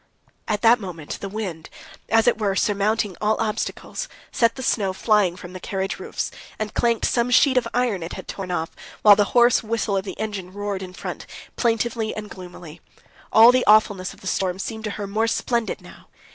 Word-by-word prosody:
At 210 -2 -1
that 235 +2 +6
moment 170 -7 -7
the 200 - -4
wind, 190 -6 -5 0.4
as 225 0 +4
it 240 -2 +3
were, 200 -3 0
surmounting 205 0 +1
all 215 +1 +1
obstacles, 225 - -3 0.2
sent 230 -1 +2
the 260 - -6
snow 195 -6 +1
flying 205 -3 +2
from 180 0 -10
the 185 - -7
carriage 190 +1 -3
roofs, - - -4 0.3
and 215 -1 -4
clanked 235 -2 +1
some 240 0 +1
sheet 260 +2 +5
of 255 - +2
iron 240 -6 0
it 165 - -6
had - - -8
torn 190 -2 -6
off, 165 -2 -2 0.3
while 210 -1 +9
the 205 0 +3
hoarse 240 +1 +6
whistle 220 -2 -1
of 190 - -1
the 195 - -8
engine 200 -4 -4
roared 205 -1 -3
in 185 -1 -8
front, - - -7 0.3
plaintively 230 -1 0
and 210 -1 -7
gloomily. 175 -3 -11 0.5
All 225 +2 +8
the 255 0 +2
awfulness 205 -3 +4
of - - -16
the - - -14
storm 185 -1 -1
seemed 220 +3 -5
to - - -2
her 205 - -4
more 215 +3 0
splendid 235 0 -1
now. - - -15
210 Hz, 200 wpm, -23 LUFS, 190-225 Hz, 0.5 s, while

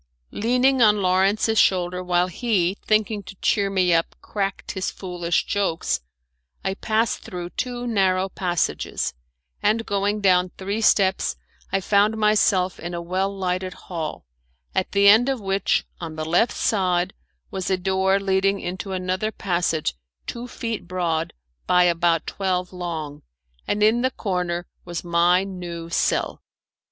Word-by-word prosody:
Leaning 250 +3 +2
on 210 -2 +5
Lawrence's 195 +4 +2
shoulder, 180 -1 +2
while 180 0 +2
he, 190 -2 0
thinking 215 -1 +1
to 190 0 -11
cheer 200 +1 +1
me 185 -3 +2
up, 165 0 +1
cracked 195 -2 -3
his 190 0 -2
foolish 175 -2 -2
jokes, 195 - 0 0.7
I 190 - +1
passed 220 +2 0
through 175 -1 -7
two 245 -1 -3
narrow 190 -4 +2
passages, 175 - -1 0.5
and 225 +2 +2
going 205 +1 0
down 180 -2 +3
three 200 +3 -3
steps 190 - +3 0.4
I 195 0 +1
found 205 +3 +3
myself 205 -4 +2
in 175 +1 -5
a - - -3
well 185 +3 -1
lighted 185 -1 -2
hall, 165 - -6 0.5
at 185 - -1
the 200 0 +4
end 225 +6 +7
of 265 -2 -1
which, 195 -1 0
on 165 -2 -6
the 155 0 -4
left 175 +9 +2
hand - - -9
side, 185 -3 +1 0.4
was 190 -1 -3
a 190 - +2
door 190 +1 +2
leading 195 0 +1
into 185 +2 -5
another 185 +3 -1
passage 175 -6 -1 0.3
two 240 +1 -5
feet 230 -6 -5
broad 170 -3 -1 0.4
by 180 0 +5
about 170 -1 +2
twelve 185 -2 -2
long, 160 -5 -5 0.5
and 210 0 +1
in 225 +3 +4
the 260 - +2
corner 180 -6 -2 0.2
was 175 -1 -5
my 175 +2 +3
new 175 -3 -7
cell. - - 0
190 Hz, 145 wpm, -23 LUFS, 175-205 Hz, 0.7 s, end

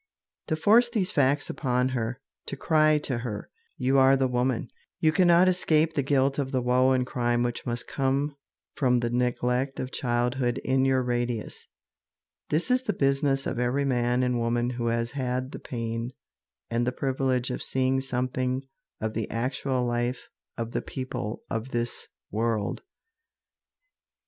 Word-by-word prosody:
To 155 - +1
force 220 +9 +5
these 210 -5 0
facts 145 -2 +2
upon 125 -2 0
her, 120 -1 -2 0.3
to 140 - -4
cry 155 0 +4
to 130 -5 -2
her, 115 -4 -5 0.3
"You 135 +2 +3
are 135 +1 +6
the 135 0 +2
woman, 125 -1 -1 0.3
you 160 -3 +4
cannot 175 +1 +5
escape 165 -3 +2
the 145 - +1
guilt 135 0 +2
of 135 -2 -2
the 130 - +1
woe 125 +1 +4
and 125 -1 +1
crime 120 -1 0
which 120 +1 -3
must 120 0 -3
come 140 +2 0 0.4
from 125 -3 +2
the 120 -1 -1
neglect 125 +2 0
of 130 - -4
childhood 120 0 0
in 130 0 +2
your 130 -1 +2
radius," 120 -2 -2 0.8
this 165 +11 0
is 255 0 +4
the 250 -5 -1
business 135 -2 +1
of 125 - -2
every 125 +3 +1
man 125 -1 +1
and 125 -1 +1
woman 120 +1 0
who 120 -1 -2
has 115 0 0
had 130 -1 -2
the - - -7
pain 115 0 -4 0.6
and 120 +1 +1
the - - +2
privilege 130 -1 0
of - - -4
seeing 130 0 +1
something 130 0 -1 0.4
of 110 0 -2
the 110 -1 -3
actual 130 +2 -1
life 120 +1 -2 0.3
of 115 -1 -3
the - - -1
people 130 -5 -5
of 115 +3 -3
this 120 -1 -3 0.2
world. 110 -1 -1
130 Hz, 160 wpm, -27 LUFS, 120-135 Hz, 0.8 s, are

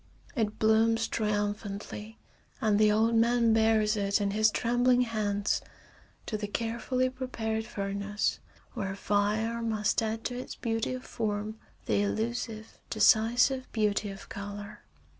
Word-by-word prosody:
It 220 -4 -1
blooms 225 +1 +3
triumphantly, 210 0 -3 0.4
and 210 -2 +2
the 215 -1 +5
old 220 +2 +3
man 230 0 +4
bears 220 -1 +3
it 200 0 +1
in 200 -1 0
his 215 +1 +4
trembling 245 +2 +2
hands 210 -4 0 0.6
to 215 - -2
the 205 -1 -4
carefully 235 +4 -1
prepared 230 -4 -3
furnace 200 +1 -2 0.3
where 195 -5 -3
fire 210 +4 0
must 220 -2 +1
add 225 0 -2
to 245 - -3
its 255 - -7
beauty 225 +1 -1
of 255 - -8
form 215 -1 -3 0.3
the - - +2
illusive, 220 +1 -3
decisive 235 +5 +3
beauty 210 -1 +1
of 195 0 -9
color. 205 +1 -7
220 Hz, 130 wpm, -29 LUFS, 205-230 Hz, 0.6 s, the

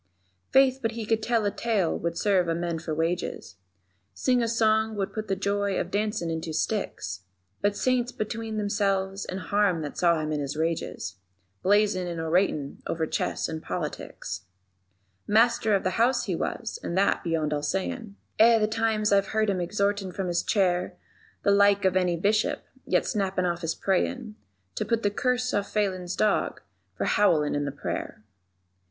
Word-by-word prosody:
_ - - -45
Faith, 265 -1 +5
but 225 -1 -1
he 225 -1 -4
could 225 +1 +1
tell 230 -1 +1
a 205 - +1
tale 210 -8 0
would 170 0 -3
serve 190 -2 +2
a 165 - +1
man 170 -1 -2
for 160 0 -6
wages, 165 - -2 0.6
Sing 250 -2 +2
a 230 - +1
song 220 -1 +2
would 195 -2 -2
put 215 -1 -4
the 195 - 0
joy 200 0 0
of 175 - -3
dancin' 205 -5 -1
in 160 0 -2
two 160 -1 -5
sticks; 100 - -2 0.4
But 205 0 +1
Saints 250 -1 +1
between 220 0 -4
themselves 195 -2 0
and 185 - -4
harm 195 -4 +1
that 145 - -6
saw 170 -2 +4
him 155 0 -2
in 150 - -1
his 145 +1 -3
rages, 160 - -2 0.4
Blazin' 200 -2 +3
and 170 -1 -4
oratin' 160 -3 0
over 160 -1 -1
chess - - -1
and 160 -1 -5
politics. - - -5 0.8
Master 220 -1 +4
of 195 - 0
the 185 +3 -1
House 245 +1 +2
he - - -1
was, - - -3
and 170 - -3
that 200 +1 +2
beyond 160 -3 0
all 145 - -1
sayin', 200 - -3 0.2
Eh, 230 +1 +7
the 215 -1 +2
times 220 -1 +1
I've 195 -1 +3
heard 215 -1 +3
him 185 -2 -1
exhortin' 200 +1 0
from 190 -1 -3
his 175 - +1
chair 180 -4 +1 0.5
The 200 - +4
like 200 0 +4
of 185 -1 +3
any 180 -2 +2
Bishop, 210 +5 +1 0.2
yet - - +2
snappin' 195 -4 0
off 175 -1 -1
his 165 -1 -1
prayin' 215 +4 -1 0.4
_To - - -1
put 230 -1 +1
the 205 - +2
curse 250 +3 0
on 205 - +2
Phelan's 190 -4 -2
dog 215 - +1 0.4
for - - -1
howlin' 160 -8 +3
in 145 0 0
the 140 - -2
prayer. 105 - -5
200 Hz, 185 wpm, -27 LUFS, 170-215 Hz, 0.8 s, Eh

